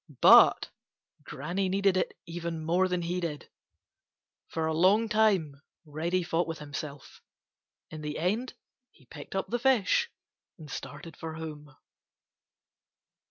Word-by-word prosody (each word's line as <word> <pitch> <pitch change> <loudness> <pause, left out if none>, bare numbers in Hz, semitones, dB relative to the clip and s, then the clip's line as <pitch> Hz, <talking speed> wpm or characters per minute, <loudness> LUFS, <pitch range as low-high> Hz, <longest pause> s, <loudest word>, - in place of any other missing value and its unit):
But - - +7 0.5
Granny 180 +7 -3
needed 195 0 +2
it 185 - -1
even 165 -2 -5
more 180 +3 +2
than 180 -1 -2
he 175 +2 -2
did. 160 -4 -5 1.0
For 160 -1 -2
a 160 - 0
long 195 +7 +4
time 195 -10 +1 0.2
Reddy 165 +4 -1
fought 170 0 0
with 165 -1 -4
himself. 145 -1 -8 0.7
In 155 - -7
the 150 0 -4
end 210 +10 -1 0.3
he 135 - -24
picked 145 +7 -10
up 195 - -2
the 240 - -1
fish 265 - +2 0.5
and 150 -3 -11
started 165 +3 -8
for 160 -1 -7
home. 150 -3 -8
170 Hz, 130 wpm, -29 LUFS, 155-190 Hz, 1.0 s, But